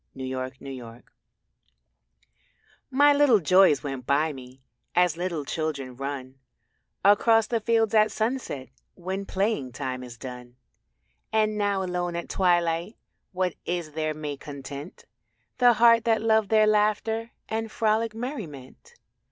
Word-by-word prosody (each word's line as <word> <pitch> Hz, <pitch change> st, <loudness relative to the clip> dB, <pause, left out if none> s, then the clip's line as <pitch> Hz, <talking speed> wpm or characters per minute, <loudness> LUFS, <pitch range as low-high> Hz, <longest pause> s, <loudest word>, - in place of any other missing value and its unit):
THE 130 Hz, 0 st, -5 dB
LITTLE 130 Hz, 0 st, -5 dB
JOYS 125 Hz, -4 st, -9 dB, 1.9 s
My 285 Hz, +2 st, +5 dB
little 285 Hz, -6 st, +5 dB
joys 185 Hz, -4 st, +4 dB
went 135 Hz, -3 st, -5 dB
by 150 Hz, +3 st, +2 dB
me 130 Hz, 0 st, -13 dB, 0.3 s
As 180 Hz, -3 st, +3 dB
little 170 Hz, -4 st, -3 dB
children 140 Hz, -5 st, -3 dB
run 135 Hz, 0 st, -6 dB, 0.7 s
Across 225 Hz, +2 st, +5 dB
the 235 Hz, -, +1 dB
fields 225 Hz, 0 st, +1 dB
at 215 Hz, -1 st, +5 dB
sunset 220 Hz, -, -3 dB, 0.3 s
When 190 Hz, +2 st, -5 dB
playing 190 Hz, -, -1 dB
time 130 Hz, -1 st, -4 dB
is 120 Hz, -2 st, -10 dB
done. 125 Hz, -1 st, -9 dB, 0.8 s
And 215 Hz, -1 st, +2 dB
now 200 Hz, -2 st, 0 dB
alone 180 Hz, -1 st, -2 dB
at 170 Hz, -, -5 dB
twilight 175 Hz, +1 st, +1 dB, 0.3 s
What 185 Hz, -2 st, -1 dB
is 175 Hz, -3 st, -3 dB
there 155 Hz, 0 st, -2 dB
may 150 Hz, -2 st, -5 dB
content 140 Hz, +3 st, -9 dB, 0.5 s
The 245 Hz, -1 st, +6 dB
heart 230 Hz, 0 st, +5 dB
that 225 Hz, -1 st, +2 dB
loved 220 Hz, -2 st, +3 dB
their 215 Hz, -1 st, +5 dB
laughter 215 Hz, +2 st, +1 dB, 0.2 s
And 225 Hz, 0 st, -3 dB
frolic 220 Hz, 0 st, 0 dB
merriment? 225 Hz, -, -8 dB
180 Hz, 130 wpm, -26 LUFS, 140-220 Hz, 1.9 s, The